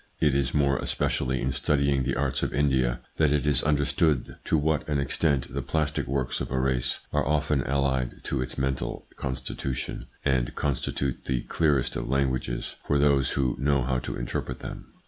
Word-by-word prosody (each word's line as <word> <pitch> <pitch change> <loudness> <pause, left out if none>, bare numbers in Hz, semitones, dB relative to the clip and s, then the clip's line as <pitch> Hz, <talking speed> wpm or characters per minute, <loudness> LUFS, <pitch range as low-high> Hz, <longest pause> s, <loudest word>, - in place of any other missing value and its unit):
It 75 -3 +3
is 70 -2 +1
more 70 -2 +2
especially 65 -1 0
in 65 - +1
studying 70 -1 +2
the 65 - 0
arts - - 0
of - - -1
India 65 -4 +2 0.2
that 75 -2 +4
it 75 0 +1
is 75 -3 +5
understood 75 -1 +1
to 80 - +2
what 75 +1 0
an 75 - +1
extent 70 0 0
the - - -1
plastic 75 -2 -1
works 65 -1 -1
of - - -3
a 65 - 0
race 65 -1 0
are - - +2
often 75 -1 +1
allied 65 -2 0
to 70 - -1
its 65 0 -4
mental 65 -3 -2
constitution, 65 0 -4 0.2
and 65 -3 +1
constitute 70 -1 -1
the 65 -2 0
clearest 75 -3 +1
of - - -3
languages 65 -3 -1
for 75 - +1
those 70 -2 +3
who 65 -3 +1
know 70 -1 +2
how 65 0 0
to - - -5
interpret - - -4
them. - - -7
70 Hz, 180 wpm, -27 LUFS, 65-70 Hz, 0.2 s, is